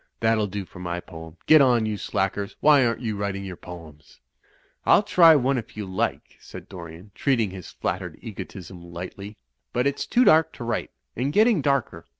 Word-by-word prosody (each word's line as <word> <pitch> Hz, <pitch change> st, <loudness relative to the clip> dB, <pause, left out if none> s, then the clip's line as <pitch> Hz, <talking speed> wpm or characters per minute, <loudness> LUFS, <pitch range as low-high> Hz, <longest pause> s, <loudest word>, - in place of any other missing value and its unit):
That'll 110 Hz, -2 st, +2 dB
do 100 Hz, 0 st, -5 dB
for 90 Hz, -, -14 dB
my 90 Hz, -1 st, -3 dB
poem. 80 Hz, -2 st, -11 dB
Get 155 Hz, -1 st, +7 dB
on, 120 Hz, -4 st, +4 dB
you 110 Hz, -1 st, -2 dB
slackers; 100 Hz, 0 st, -2 dB
why 145 Hz, -3 st, +5 dB
aren't 115 Hz, 0 st, 0 dB
you 110 Hz, -3 st, -2 dB
writing 100 Hz, -1 st, -3 dB
your 95 Hz, -2 st, -6 dB
poems?" 80 Hz, -5 st, -13 dB, 0.6 s
*T'll -, -, +5 dB
try 170 Hz, -6 st, +6 dB
one 135 Hz, -1 st, +2 dB
if 110 Hz, -, -11 dB
you 105 Hz, -, -4 dB
like," 95 Hz, 0 st, -3 dB
said -, -, -11 dB
Dorian, 85 Hz, +2 st, -11 dB
treating 115 Hz, -8 st, 0 dB
his 90 Hz, -3 st, -9 dB
flattered 90 Hz, -2 st, -4 dB
egotism 95 Hz, -5 st, -9 dB
lightly. 90 Hz, +4 st, -8 dB, 0.4 s
"But 125 Hz, +2 st, +1 dB
it's 140 Hz, 0 st, -1 dB
too 245 Hz, -, +3 dB
dark 160 Hz, -7 st, +5 dB
to -, -, -8 dB
write; 115 Hz, -, -2 dB, 0.3 s
and 130 Hz, +4 st, -1 dB
getting 215 Hz, -1 st, +4 dB
darker." 140 Hz, -3 st, -1 dB
105 Hz, 180 wpm, -24 LUFS, 90-135 Hz, 0.6 s, Get